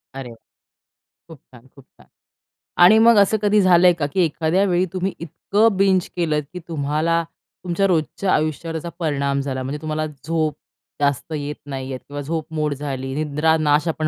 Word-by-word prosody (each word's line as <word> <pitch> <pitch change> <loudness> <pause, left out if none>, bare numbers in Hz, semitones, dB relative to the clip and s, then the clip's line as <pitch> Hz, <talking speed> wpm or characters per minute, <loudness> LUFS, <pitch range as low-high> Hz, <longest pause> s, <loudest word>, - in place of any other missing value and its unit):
अरे 135 -3 -7
वाह! 115 - -13 1.0
खूप - - -19 0.2
छान, 125 +1 -16
खूप 140 -2 -17
छान. - - -24 0.8
आणि 215 +5 +8
मग 230 0 +6
असं 205 +2 +4
कधी 210 0 +3
झालंय 180 -1 +5
का 160 -4 -2
की 190 - +2
एखाद्या 165 +4 +1
वेळी 180 0 +1
तुम्ही 185 +1 -2
इतकं 200 +6 +1
बिंज 190 -2 +2
केलं 155 -4 0
की 180 - -6
तुम्हाला 160 +2 0 0.4
तुमच्या 180 +2 0
रोजच्या 180 +2 0
आयुष्यावर 155 +2 -1
त्याचा 165 +2 -4
परिणाम 140 -3 -1
झाला. 130 -2 -4
म्हणजे 145 +3 -5
तुम्हाला 155 0 -2
झोप 155 +1 -2 0.5
जास्त 140 +2 0
येत 145 -1 -4
नाही 135 -2 -6
येत 130 - -5
किंवा 145 0 -6
झोपमोड 155 0 -3
झाली. 135 -2 -5
निद्रानाश 150 0 +1
आपण 155 -1 -1
155 Hz, 165 wpm, -21 LUFS, 145-175 Hz, 1.0 s, आणि